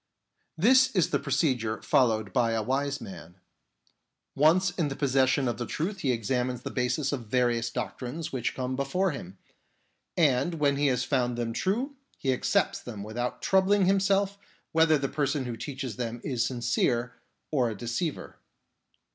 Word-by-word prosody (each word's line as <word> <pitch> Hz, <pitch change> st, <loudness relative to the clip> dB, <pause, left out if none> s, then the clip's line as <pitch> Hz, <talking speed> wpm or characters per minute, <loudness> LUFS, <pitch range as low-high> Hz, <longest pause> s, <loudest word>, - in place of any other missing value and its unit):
This 255 Hz, +9 st, +5 dB
is 180 Hz, -5 st, +2 dB
the -, -, +2 dB
procedure 130 Hz, -6 st, 0 dB
fol 130 Hz, -, +4 dB
lowed 110 Hz, -3 st, -2 dB
by 115 Hz, -2 st, +2 dB
a 110 Hz, -1 st, 0 dB
wise 140 Hz, +4 st, -1 dB
man. 90 Hz, -4 st, -10 dB, 1.0 s
Once 170 Hz, +6 st, +4 dB
in 170 Hz, -4 st, -1 dB
possession 135 Hz, -1 st, +2 dB
of 120 Hz, -, -1 dB
the 120 Hz, -, -4 dB
truth 190 Hz, +6 st, -3 dB
he 135 Hz, -6 st, +1 dB
examines 125 Hz, +2 st, -1 dB
the -, -, -5 dB
basis 135 Hz, +3 st, 0 dB
of 125 Hz, -6 st, -4 dB
various 120 Hz, 0 st, +1 dB
doctrines 135 Hz, +7 st, -5 dB
which 125 Hz, -3 st, -2 dB
come 130 Hz, 0 st, -2 dB
before 150 Hz, +8 st, 0 dB
him, 95 Hz, -9 st, -8 dB, 0.8 s
and 150 Hz, 0 st, +3 dB
when 145 Hz, -3 st, +2 dB
he 145 Hz, 0 st, +2 dB
has 125 Hz, -2 st, +1 dB
found 125 Hz, -3 st, 0 dB
them 115 Hz, -1 st, -2 dB
true, 240 Hz, -, -1 dB, 0.2 s
he 135 Hz, -1 st, 0 dB
accepts 125 Hz, -, +1 dB
them 105 Hz, -4 st, -7 dB
without 120 Hz, +4 st, -4 dB
troubling 190 Hz, +1 st, +3 dB
himself 195 Hz, +1 st, +2 dB, 0.3 s
whether 160 Hz, -1 st, +4 dB
the 135 Hz, -1 st, -1 dB
person 140 Hz, -1 st, -1 dB
who 120 Hz, -1 st, -4 dB
teaches 130 Hz, -1 st, -5 dB
them 120 Hz, -1 st, -3 dB
is 125 Hz, -4 st, 0 dB
sincere 120 Hz, -1 st, 0 dB, 0.4 s
or 130 Hz, -6 st, +2 dB
a 110 Hz, -, -6 dB
deceiver. 120 Hz, -, -4 dB
130 Hz, 160 wpm, -28 LUFS, 120-155 Hz, 1.0 s, This